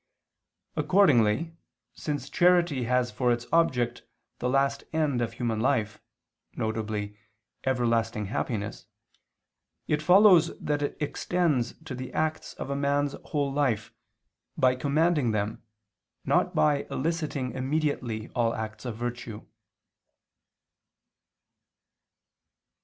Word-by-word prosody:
Accordingly 160 - +3 0.4
since 145 -4 -4
charity 175 -5 +3
has 125 0 +1
for 125 -2 +1
its 120 0 -1
object 125 -8 +2 0.4
the 125 - -1
last 135 +1 +1
end 150 -6 +1
of 115 - -2
human 115 -3 -2
life, 110 -3 0 0.5
viz. 110 -2 -2 0.5
everlasting 115 -4 +1
happiness, 105 +1 -3 1.0
it 150 0 +1
follows 180 0 +6
that 145 -1 -2
it 145 - -2
extends 150 -4 0
to 155 - -6
the 130 0 -6
acts 155 0 -2
of 140 - -5
a - - -1
man's 140 0 +1
whole 140 -2 -1
life, 120 -6 0 0.6
by 130 -1 +4
commanding 145 -2 +1
them, 105 +1 -2 0.6
not - - +2
by 145 -2 +2
eliciting 150 -4 -2
immediately 130 -5 -2
all 115 -1 0
acts 110 +1 -6
of 115 -3 -4
virtue. 120 -2 -5
130 Hz, 105 wpm, -27 LUFS, 115-150 Hz, 1.0 s, follows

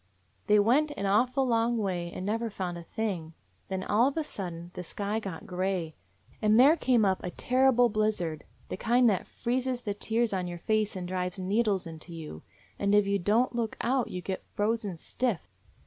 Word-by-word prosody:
They 210 0 +6
went 250 +9 +4
an 200 - -2
awful 250 +7 +2
long 235 -1 +2
way 180 -5 -2
and 185 - -6
never 225 +3 -1
found 185 -4 -4
a 170 - -6
thing. 170 -5 -4 0.3
Then 190 0 -3
all 225 +6 +3
of 280 - -3
a 320 - +1
sudden 175 - -6
the 180 - -6
sky 205 +4 -3
got 195 -6 -7
gray, 180 -3 -2 0.5
and 215 +1 +4
there 285 +5 +7
came 245 -8 +3
up 190 -1 +1
a 180 - -2
terrible 250 +4 +3
blizzard; 210 -8 -1 0.3
the - - -4
kind 240 +3 +3
that 190 - -2
freezes 250 +1 -2
the 205 - -2
tears 225 +2 0
on 185 -2 -1
your 175 0 -5
face 215 +3 0
and 180 -1 -4
drives 180 0 -2
needles 195 0 +1
into 165 +1 -9
you, 150 - -8 0.4
and 200 0 +3
if 205 -1 +5
you 200 0 +1
don't 220 +8 +2
look 235 -2 -2
out 255 +1 +1
you 180 -1 -5
get 190 +1 -3
frozen 210 -3 0
stiff. 235 - -1
205 Hz, 195 wpm, -29 LUFS, 180-235 Hz, 0.5 s, there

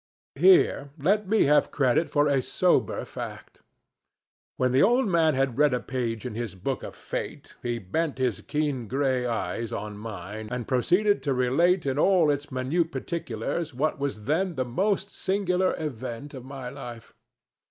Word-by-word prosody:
Here 370 - +4
let 195 +7 +1
me 220 +1 +4
have 145 +1 +4
credit 135 +4 +2
for 145 0 +3
a 140 -2 +2
sober - - +1
fact. - - -8 1.0
When 130 -1 +2
the 130 +2 +4
old 240 - +4
man 165 -5 +3
had 135 -1 0
read 150 -4 +4
a - - -1
page 120 -3 -3
in 125 - -4
his 115 -3 -4
book 125 +8 -3
of - - -8
fate, - - -6
he 120 -1 -2
bent 140 - -2
his 125 -6 0
keen 145 -6 -2
gray 130 0 0
eyes 115 -1 -2
on 105 0 -5
mine 105 0 -7
and 125 -1 -4
proceeded 180 - +2
to 140 -3 0
relate 165 +8 +2
in 135 +1 0
all 175 -4 +4
its 145 0 -3
minute 150 +7 0
particulars 160 - -3
what 145 +2 0
was 140 -7 -3
then 170 - 0
the 130 - -1
most 195 - 0
singular 185 -1 0
event 130 -2 -5
of 130 -3 -8
my 130 -1 -7
life. 120 -4 -9
135 Hz, 165 wpm, -26 LUFS, 120-165 Hz, 1.0 s, Here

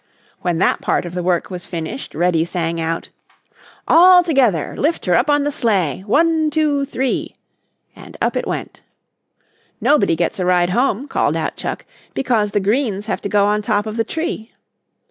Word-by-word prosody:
When 175 -2 -1
that 180 - +1
part - - 0
of 175 - -7
the 180 - -2
work 175 0 0
was 180 -1 -6
finished, 170 - -6
Reddy 170 0 +2
sang 165 -1 -3
out: 165 +1 -3 0.8
"All 360 +2 +7
together! 255 - +1
Lift 320 +4 -1
her 180 +5 +3
on 290 -1 +3
the 290 - -1
sled. 195 - -1
One, 315 +5 +2
two, 295 -2 +1
three!" 265 -2 -2 0.6
and - - -13
up - - 0
it - - -2
went. - - -5 1.0
"Nobody 290 - +3
gets 170 +5 -2
a 180 - 0
ride 180 -1 +2
home," 250 +3 0
called - - 0
out - - -3
Chuck, - - -5 0.3
"because 230 -5 +1
the 205 - 0
greens 210 0 0
have 220 - -3
to 200 - -4
go 205 -1 +3
on 210 +1 +1
top 205 -1 0
of 215 0 -5
the 225 - +1
tree." 320 -7 -4
210 Hz, 175 wpm, -19 LUFS, 180-280 Hz, 1.0 s, All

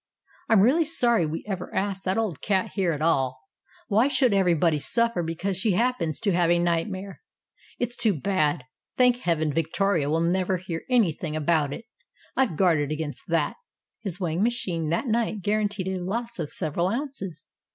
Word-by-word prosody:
I'm 220 -4 +6
really 275 +11 +4
sorry 240 - +2
we 160 +2 -5
ever 190 -3 -5
asked 195 0 -2
that 185 +2 +1
old 215 -9 -2
cat 190 -3 0
here 190 -4 +1
at 150 -1 -3
all; 130 -5 +1 0.5
why 220 +6 +3
should 260 -5 +2
every 185 -3 +3
body 160 -1 +2
suffer 230 - +1
because 170 +3 -2
she 200 +1 +1
happens 185 - 0
to 200 - +1
have 175 -1 +2
a 175 - +4
nightmare? 185 +3 -2 0.6
It's 245 0 -1
too 210 - +2
bad. 155 -7 0 0.3
Thank 250 -1 +5
Heaven, 160 - 0
Victoria 165 0 0
will 160 +2 +1
never 185 +2 +1
hear 170 -2 -6
anything 175 - +1
about 155 -2 +1
it. 225 - -7 0.5
I've 260 -11 +1
guarded 155 -5 +2
against 155 -1 -4
that." 165 -3 0 0.4
His 195 -4 -5
weighing 175 -1 -1
machine 185 -9 -1
that 170 - 0
night 225 -4 -1
guaranteed 205 -2 0
a 190 -1 -2
loss 230 +5 -4
of 155 -3 -3
several 170 +1 -1
ounces. 195 - -4
185 Hz, 170 wpm, -25 LUFS, 165-215 Hz, 0.6 s, I'm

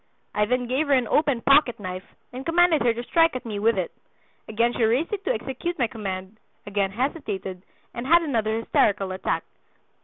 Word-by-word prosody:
I 210 - +2
then 250 +3 0
gave 265 +5 0
her 285 - +3
an 255 -3 +3
open 285 -4 +2
pocketknife 235 -10 +2 0.3
and 255 +1 -6
commanded 335 0 +3
her 240 - +3
to 235 +1 -4
strike 330 +3 +3
at 255 - -5
me 210 -3 -4
with 225 0 +2
it. 180 -3 -2 0.6
Again 230 +2 +1
she 240 - -1
raised 250 - +1
it 400 -1 -3
to - - +1
execute 340 - -3
my 250 - +2
command, 200 -3 -6 0.3
again 200 -1 0
hesitated, 210 - -3 0.3
and 235 +2 -5
had 340 +2 +5
another 225 -7 0
hysterical 195 -4 +1
attack. 185 - -2
240 Hz, 185 wpm, -24 LUFS, 210-285 Hz, 0.6 s, had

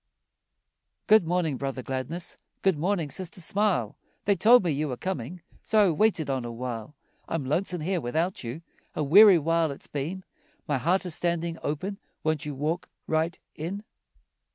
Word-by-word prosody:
Good 215 -6 +5
morning, 165 -5 0
Brother 135 -1 -4
Gladness, 135 +8 -4 0.3
Good 190 -3 +4
morning, 170 -3 0
Sister 185 -1 -3
Smile, 180 - +1 0.3
They 200 - +3
told 235 +3 +6
me 170 - +1
you 150 +2 -1
were 125 -3 -4
coming, 175 0 -4 0.2
So 215 -3 +4
I - - +2
waited 165 -3 +2
on 135 -2 -1
a 120 - -5
while. 115 +1 -6 0.3
I'm 160 -4 -2
lonesome 175 +5 0
here 180 +2 -1
without 160 +9 -1
you, 125 +8 -6 0.3
A 155 - 0
weary 195 +6 +8
while 165 +1 +1
it's 140 - -6
been, 160 +7 -4 0.4
My 145 -3 0
heart 180 +7 +1
is 180 - -1
standing 170 0 -1
open, 185 +7 -3 0.2
Won't 155 -2 0
you 145 - -4
walk 155 +6 -2 0.2
right 160 +2 0 0.2
in? 185 +7 -5
165 Hz, 165 wpm, -27 LUFS, 140-185 Hz, 0.4 s, weary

